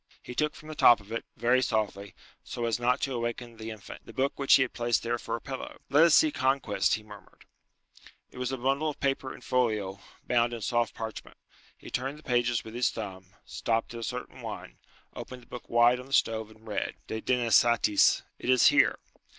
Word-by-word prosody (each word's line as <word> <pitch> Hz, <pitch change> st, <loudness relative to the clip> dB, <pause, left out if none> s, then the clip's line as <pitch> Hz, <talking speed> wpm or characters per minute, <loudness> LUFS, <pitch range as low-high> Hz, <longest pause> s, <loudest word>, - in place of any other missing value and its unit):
He 125 Hz, -, -8 dB
took 150 Hz, +4 st, 0 dB
from 155 Hz, -, -13 dB
the 155 Hz, -, -6 dB
top 120 Hz, -6 st, +6 dB
of 100 Hz, +1 st, -16 dB
it, 115 Hz, -, -3 dB
very 125 Hz, +2 st, +3 dB
softly, 105 Hz, -4 st, -2 dB, 0.3 s
so 120 Hz, -, -4 dB
as 115 Hz, -1 st, 0 dB
not 125 Hz, +1 st, +1 dB
to 135 Hz, -, -1 dB
awaken 120 Hz, 0 st, -4 dB
the 110 Hz, 0 st, -7 dB
infant, 110 Hz, -3 st, -10 dB
the -, -, -13 dB
book 135 Hz, +1 st, 0 dB
which 140 Hz, -, +6 dB
he 130 Hz, -, +5 dB
had 130 Hz, -, -5 dB
placed 120 Hz, 0 st, 0 dB
there 120 Hz, +1 st, -1 dB
for 115 Hz, -, -3 dB
a -, -, -5 dB
pillow. 135 Hz, +1 st, -7 dB
"Let 150 Hz, +4 st, +7 dB
us 170 Hz, -, +6 dB
see 315 Hz, -1 st, +5 dB
Conquest," 130 Hz, -, +1 dB
he 110 Hz, -, -8 dB
murmured. 105 Hz, -1 st, -15 dB, 0.9 s
It -, -, -11 dB
was 125 Hz, 0 st, -2 dB
a 130 Hz, -, -2 dB
bundle 135 Hz, +5 st, 0 dB
of 150 Hz, -, -7 dB
paper 135 Hz, -1 st, -1 dB
in -, -, -11 dB
folio, 105 Hz, -6 st, 0 dB, 0.3 s
bound 120 Hz, 0 st, +2 dB
in 115 Hz, -, -5 dB
soft 120 Hz, +1 st, 0 dB
parchment. 110 Hz, -1 st, -7 dB, 0.4 s
He -, -, -12 dB
turned 135 Hz, +3 st, -3 dB
the 155 Hz, -, -16 dB
pages 120 Hz, -2 st, +1 dB
with 110 Hz, -, -10 dB
his 120 Hz, 0 st, +1 dB
thumb, 95 Hz, -3 st, -8 dB
stopped 115 Hz, 0 st, -2 dB
at 115 Hz, -, -6 dB
a -, -, -6 dB
certain -, -, -6 dB
one, -, -, -8 dB, 0.4 s
opened 125 Hz, -1 st, -8 dB
the -, -, -18 dB
book 125 Hz, -, -10 dB
wide 120 Hz, +1 st, +4 dB
on 125 Hz, -, -10 dB
the 135 Hz, -, -9 dB
stove, 110 Hz, -4 st, +1 dB
and 110 Hz, +1 st, -18 dB
read, 105 Hz, -, -3 dB
"'De 110 Hz, -, -5 dB
Denasatis,' 120 Hz, -3 st, +3 dB, 0.2 s
it -, -, -4 dB
is 130 Hz, -1 st, +6 dB
here." -, -, +4 dB
120 Hz, 215 wpm, -28 LUFS, 110-130 Hz, 0.9 s, Let